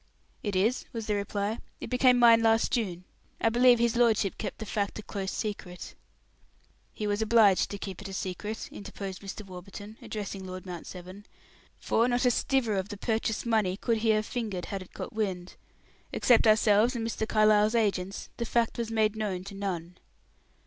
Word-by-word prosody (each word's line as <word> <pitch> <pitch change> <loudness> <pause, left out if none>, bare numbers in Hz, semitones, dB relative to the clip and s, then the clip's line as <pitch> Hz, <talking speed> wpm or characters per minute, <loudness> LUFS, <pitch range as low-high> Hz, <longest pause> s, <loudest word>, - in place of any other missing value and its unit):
"It 205 -3 -3
is," 215 +7 +1
was 225 -2 -4
the 210 - 0
reply. 205 +2 -2 0.2
"It - - -7
became 250 0 +5
mine 230 -1 +7
last 225 0 +3
June. 185 -7 -1 0.4
I 225 - +3
believe 245 +1 +5
his 235 0 +1
lordship 225 -5 +2
kept - - -4
the 220 - -6
fact 205 -1 -2
a 215 - -7
close 195 -2 -4
secret." 185 -4 -5 1.0
"He 210 - -5
was 205 +1 0
obliged 215 -4 +4
to 200 - -5
keep 195 -2 -7
it 200 - -7
a - - -7
secret," 200 +4 -4
interposed 200 -2 -7
Mr. 200 +1 -7
Warburton, 195 +3 -10
addressing 200 -2 -5
Lord 185 0 -7
Mount 175 -3 -7
Severn, 185 +3 -10 0.5
"for 230 +2 +1
not 245 0 +1
a 250 - +5
stiver 235 -4 +1
of 190 +1 -2
the 205 - -6
purchase 220 0 -1
money 215 -5 +1
could 230 +1 0
he 220 +1 0
have 215 0 +3
fingered 210 -8 -3
had 195 -1 -5
it 185 - -12
got - - -6
wind. 190 -5 -3 0.6
Except 235 -2 +4
ourselves 215 +2 +4
and 230 -1 -2
Mr. 220 -1 -2
Carlyle's 215 +1 +4
agents, 195 -4 -1
the 235 - -2
fact 235 +1 0
was 230 -1 -2
made 220 -1 +1
known 200 -4 -2
to 200 +1 -9
none." 180 -3 -4
210 Hz, 185 wpm, -29 LUFS, 195-225 Hz, 1.0 s, mine